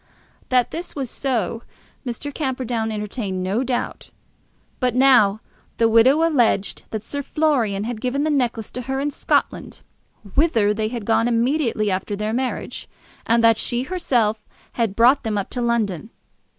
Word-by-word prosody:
That 250 -2 +2
this 345 +2 -6
was 270 -5 -4
so 235 -5 -2 0.4
Mr. 270 +3 -5
Camperdown 250 -6 -2
entertained 210 -3 -4
no 200 +7 0
doubt. 250 -1 -3 0.7
But 250 -2 0
now 245 -6 +5 0.4
the 230 - +4
widow 250 +8 +5
alleged 240 -10 +1
that 220 -1 -4
Sir 285 +5 -4
Florian 260 -9 0
had 225 -1 -5
given 265 +3 -1
the 310 - +1
necklace 240 -6 -1
to 250 - -5
her 265 +2 -3
in 290 +1 -1
Scotland, - - -1 0.5
whither 230 -10 +3
they 215 0 -1
had 230 -2 -5
gone 225 +1 +2
immediately 235 -3 +1
after 190 +2 -2
their 210 +2 -2
marriage, 255 +1 -3 0.4
and 230 0 +3
that 230 -1 +5
she 240 +1 -1
herself 240 - 0 0.3
had 225 -5 -1
brought 245 +5 +5
them 220 -3 -2
up 200 - -3
to 245 - -3
London. 220 -5 -1
235 Hz, 155 wpm, -22 LUFS, 215-265 Hz, 0.7 s, now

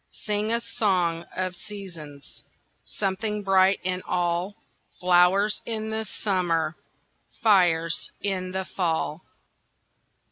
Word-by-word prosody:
Sing 210 0 0
a 235 - +2
song 185 -8 0
of 185 -1 -2
seasons! 170 -9 -10 0.5
Something 210 +1 -2
bright 190 0 +4
in 185 0 -1
all! 175 +2 0 0.4
Flowers 180 +3 +4
in 220 -1 -3
the 220 0 -2 0.2
summer, 170 -5 +1 0.7
Fires 175 -6 +3
in 185 -2 -2
the 190 0 -2
fall! 165 -3 -1
185 Hz, 100 wpm, -26 LUFS, 175-205 Hz, 0.7 s, bright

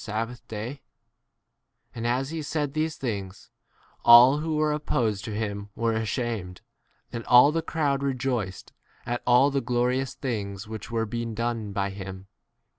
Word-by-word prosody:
sabbath 115 +3 -4
day? 115 +6 -6 1.1
And 115 0 -3
as 130 +4 0
ho 165 -1 -3
said 145 -1 -2
these 155 0 -1
things, 100 -7 -5 0.5
all 125 +4 +8
who 160 0 -2
were 150 0 +2
oppos 120 -8 0
ed - - -9
to 110 - -5
him 100 -1 -3
were 115 0 0
ashamed; 110 -4 -3 0.5
and 115 -1 -4
all 125 +4 +7
the 165 +1 0
crowd 145 -4 0
rejoiced 125 -8 -2 0.3
at 120 0 -2
all 125 +3 +5
the 140 0 0
glori 125 +2 +1
ous 135 -2 -6
things 100 -6 -4
which 110 -1 -7
were 115 -1 0
being 115 +1 -4
done 115 -2 -2
by 100 0 -1
him. 95 -1 -8
120 Hz, 160 wpm, -26 LUFS, 105-135 Hz, 1.1 s, all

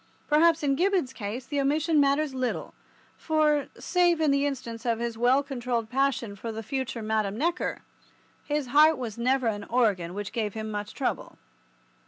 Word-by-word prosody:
Perhaps 325 +1 +4
in 280 -1 +2
Gibbon's 355 -5 +1
case 235 +2 -5
the 285 0 -1
omission 305 +3 +2
matters 285 +1 +2
little, 255 -1 -3 0.4
for, 305 -2 +1
save 350 -2 +2
in 310 -3 +3
the 280 +1 +2
instance 230 -5 -5
of 235 -2 0
his 235 0 -3
well 250 +4 +3
controlled 245 -4 -3
passion 260 -5 0
for 225 +3 -6
the 225 0 -6
future 255 0 -3
Madame 215 -2 -1
Neckar, 340 +6 -1 0.6
his 295 -3 -2
heart 305 +3 +6
was 235 -3 -6
never 260 +2 +1
an 205 -2 -1
organ 200 -8 +1
which 205 -2 -5
gave 215 -3 -2
him 220 0 -4
much 205 0 -5
trouble. - - -3
255 Hz, 170 wpm, -27 LUFS, 225-295 Hz, 0.6 s, heart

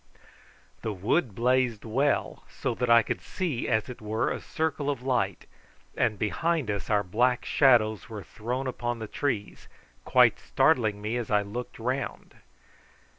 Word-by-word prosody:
The 110 - -2
wood 105 - 0
blazed 125 -1 +1
well, 135 +6 0
so 125 - -3
that 125 +1 -2
I 115 0 +7
could - - -3
see, 165 -10 -3
as 110 -2 +1
it 125 -3 -9
were, 110 +1 -1
a - - -4
circle 155 -4 -2
of 140 -3 -3
light, 100 -8 0 0.5
and 110 -3 +1
behind 145 +4 0
us 100 -1 -4
our 105 -2 +3
black 120 +6 +1
shadows 115 -6 +3
were 105 -3 -7
thrown 120 - -4
upon 120 -2 -2
the 110 - -5
trees, 115 -5 -3 0.4
quite - - +4
startling 110 -9 +2
me 110 +3 -1
as 120 -3 -4
I 105 -1 +3
looked 120 +5 -6
round. 130 +4 -3
120 Hz, 155 wpm, -27 LUFS, 105-130 Hz, 0.5 s, I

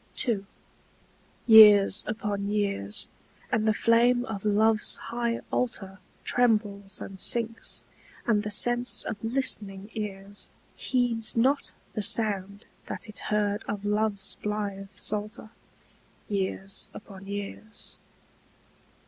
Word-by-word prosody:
II. 200 -4 -1 1.0
Years 210 -4 +7
upon 205 -2 -3
years, 200 - -1 0.4
and 220 0 0
the - - +5
flame 245 +2 +3
of 205 -6 -6
love's 215 +1 +3
high 235 0 -3
altar 195 -6 -3 0.2
Trembles 210 -5 0
and 190 -1 -9
sinks, 230 +2 +2 0.4
and 215 -3 +2
the 210 - -5
sense 240 +3 +5
of - - -4
listening 215 -5 -1
ears 200 -1 -5 0.3
Heeds 240 -3 +1
not 270 +5 +1 0.2
the 215 - -3
sound 205 -2 +1 0.2
that - - -6
it 215 - -9
heard 210 0 0
of 205 0 -5
love's 205 -1 -1
blithe 205 -2 -4
psalter 215 +1 0 0.8
Years 195 -1 -3
upon 195 -2 -12
years. 205 +2 -7
210 Hz, 105 wpm, -26 LUFS, 200-225 Hz, 1.0 s, Years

